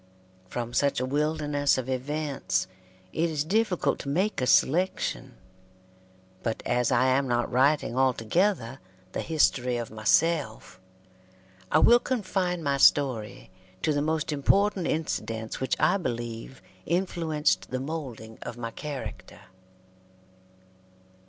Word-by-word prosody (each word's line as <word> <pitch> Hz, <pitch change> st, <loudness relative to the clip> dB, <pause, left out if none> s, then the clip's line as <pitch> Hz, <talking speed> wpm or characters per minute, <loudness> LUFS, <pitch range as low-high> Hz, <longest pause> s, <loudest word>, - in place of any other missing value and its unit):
From 120 Hz, +3 st, -5 dB
such 140 Hz, -1 st, +2 dB
a 130 Hz, -, -1 dB
wilderness 145 Hz, 0 st, +1 dB
of 130 Hz, -1 st, -3 dB
events 135 Hz, -6 st, -2 dB, 0.5 s
it 165 Hz, +1 st, +1 dB
is 150 Hz, -3 st, -1 dB
difficult 195 Hz, +2 st, +1 dB
to 140 Hz, -, -5 dB
make 180 Hz, +1 st, 0 dB
a 125 Hz, -, 0 dB
selection, 180 Hz, -, +1 dB, 1.1 s
but 115 Hz, -1 st, -3 dB
as 125 Hz, 0 st, +1 dB
I 125 Hz, +1 st, +3 dB
am 130 Hz, +1 st, +2 dB
not 120 Hz, -1 st, 0 dB
writing 135 Hz, 0 st, +2 dB
altogether 130 Hz, -, +1 dB, 0.3 s
the -, -, -3 dB
history 125 Hz, -6 st, +1 dB
of 120 Hz, -2 st, -5 dB
myself, 110 Hz, -, 0 dB, 0.9 s
I -, -, +5 dB
will 240 Hz, +1 st, +6 dB
confine 185 Hz, -8 st, -2 dB
my 140 Hz, -1 st, +1 dB
story 130 Hz, -9 st, +2 dB, 0.3 s
to 155 Hz, -, +2 dB
the 145 Hz, -, 0 dB
most 155 Hz, 0 st, -1 dB
important 190 Hz, +6 st, +2 dB
incidents 115 Hz, -8 st, -3 dB
which 130 Hz, -, 0 dB
I 195 Hz, -, +3 dB
believe 120 Hz, -, -5 dB, 0.2 s
influenced 165 Hz, -3 st, 0 dB
the 130 Hz, -, -2 dB
moulding 130 Hz, -7 st, -6 dB
of 120 Hz, -, -7 dB
my 115 Hz, -1 st, -5 dB
character. 145 Hz, +2 st, -7 dB
140 Hz, 120 wpm, -27 LUFS, 120-160 Hz, 1.1 s, will